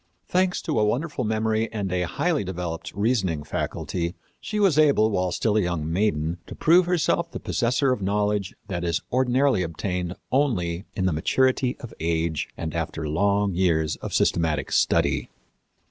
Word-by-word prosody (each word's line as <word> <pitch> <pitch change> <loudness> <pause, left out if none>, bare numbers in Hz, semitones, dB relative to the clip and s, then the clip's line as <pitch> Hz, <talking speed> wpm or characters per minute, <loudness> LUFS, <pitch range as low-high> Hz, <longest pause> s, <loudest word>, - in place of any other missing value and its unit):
Thanks 185 0 +1
to - - 0
a - - +3
wonderful 130 +6 -1
memory 110 0 0
and 100 -4 -3
a 90 -1 0
highly 165 - 0
developed 90 -3 -5
reasoning 100 -8 0
faculty, 85 +4 -3 0.2
she 215 - -3
was 185 -7 +4
able, 140 -8 +4
while 90 -2 0
still 110 +4 +1
a - - +4
young 80 -3 -2
maiden, 85 -4 0
to - - -8
prove 175 +2 +4
herself 170 -1 +1
the - - -6
possessor 125 +3 +1
of 125 - -1
knowledge 105 0 0
that 90 -4 -3
is 85 -1 0
ordinarily 130 -3 +3
obtained 90 +1 -3 0.2
only 100 -10 0
in 95 - 0
the 95 - +2
maturity 130 - +1
of 120 - -8
age 80 -1 -1
and 80 -2 -4
after 80 -1 -3
long 100 +5 +1
years 80 -4 +1
of - - -6
systematic 80 -3 +1
study. - - +2
100 Hz, 160 wpm, -25 LUFS, 85-125 Hz, 0.2 s, was